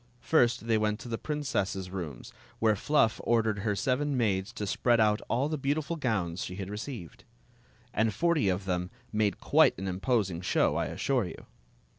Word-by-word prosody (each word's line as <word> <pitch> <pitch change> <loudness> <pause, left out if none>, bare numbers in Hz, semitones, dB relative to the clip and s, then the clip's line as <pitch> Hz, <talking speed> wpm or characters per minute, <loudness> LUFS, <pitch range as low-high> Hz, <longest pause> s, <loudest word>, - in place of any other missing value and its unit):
First 120 -7 +2
they 115 -2 +2
went 105 0 0
to - - -8
the 115 -1 -3
princess's 100 -11 -2
rooms, 80 -10 -6 0.2
where 110 -1 +3
Fluff 115 0 +2
ordered 110 -3 +2
her 105 0 0
seven 135 +4 0
maids 100 -5 0
to 105 - -4
spread 120 +4 +2
out 105 -1 +3
all 125 +5 +1
the 155 -1 -3
beautiful 145 +4 -1
gowns 95 - -1
she 90 - -6
had 95 0 -5
received. 105 - -7 0.7
And 110 +1 +2
forty 165 - +2
of 95 +1 -1
them 90 -1 -1 0.2
made 105 -1 +1
quite - - +4
an 95 +2 -4
imposing 95 -2 0
show, - - +2
I - - 0
assure 130 -6 0
you. 90 - -9
110 Hz, 175 wpm, -29 LUFS, 95-125 Hz, 0.7 s, quite